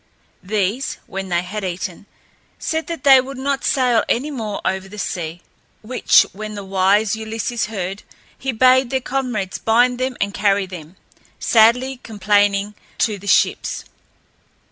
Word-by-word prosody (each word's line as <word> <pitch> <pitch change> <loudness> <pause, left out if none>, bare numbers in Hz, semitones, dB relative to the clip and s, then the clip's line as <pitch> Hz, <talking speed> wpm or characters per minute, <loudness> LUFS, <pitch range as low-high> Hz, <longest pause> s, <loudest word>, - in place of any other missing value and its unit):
These, 210 +6 -1
when 195 0 -6
they 175 0 +1
had 205 +3 -5
eaten, 185 +1 -5 0.5
said 320 0 -2
that 335 -2 -5
they 270 -2 +8
would 270 +1 -8
not 275 +1 -1
sail 245 -4 +2
any 280 +6 0
more 220 -7 -4
over 190 0 -2
the 210 - -10
sea; 175 -3 -4 0.4
which, 250 +4 +4
when 215 +1 -7
the 200 - -6
wise 195 +2 +2
Ulysses 220 +1 -3
heard, 195 -2 -4 0.3
he 265 - -3
bade 255 +2 +4
their 265 - 0
comrades 250 -8 -3
bind 245 +2 +3
them 255 -1 -2
and 200 0 -1
carry 200 -1 +2
them, 175 -2 -10 0.4
sadly 245 +3 +3
complaining, 205 -1 +1 0.2
to 210 -4 0
the 200 - -11
ships. - - +1
215 Hz, 145 wpm, -20 LUFS, 195-255 Hz, 0.5 s, they